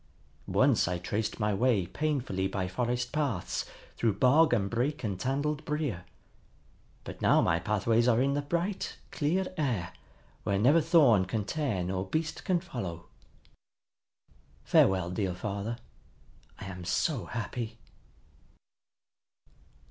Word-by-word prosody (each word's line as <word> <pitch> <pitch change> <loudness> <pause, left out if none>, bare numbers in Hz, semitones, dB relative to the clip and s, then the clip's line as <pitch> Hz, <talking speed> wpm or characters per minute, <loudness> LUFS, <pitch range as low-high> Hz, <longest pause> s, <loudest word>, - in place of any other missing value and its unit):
Once - - +3
I 90 +1 -1
traced 105 +6 -3
my 105 -1 +1
way 110 -3 +2
painfully 125 - -1
by 95 -1 -2
forest 120 +6 -2
paths 140 - -1 0.3
through 115 -3 +2
bog 145 +7 +5
and 105 -5 +2
brake 125 +8 -1
and 100 -4 -2
tangled 145 +5 -1
brier. 150 - -2 1.0
But - - -9
now - - +5
my 85 0 +2
pathways 110 +6 +1
are 115 -1 +4
in 135 +2 +2
the 145 - 0
bright, 170 +7 -2
clear 175 +6 0
air, 120 - -1 0.5
where 100 - 0
never 140 +11 +5
thorn 145 - +5
can 105 +2 -2
tear 125 - -1
nor 95 +1 -2
beast 160 +8 -2
can 185 -3 +1
follow. 95 - -6 1.5
Farewell, 95 -2 +3
dear 90 -1 -1
father! 100 +4 -4 0.8
I - - -8
am 90 -2 -7
so 125 - 0
happy!" 115 +2 -5
115 Hz, 125 wpm, -29 LUFS, 95-145 Hz, 1.5 s, bog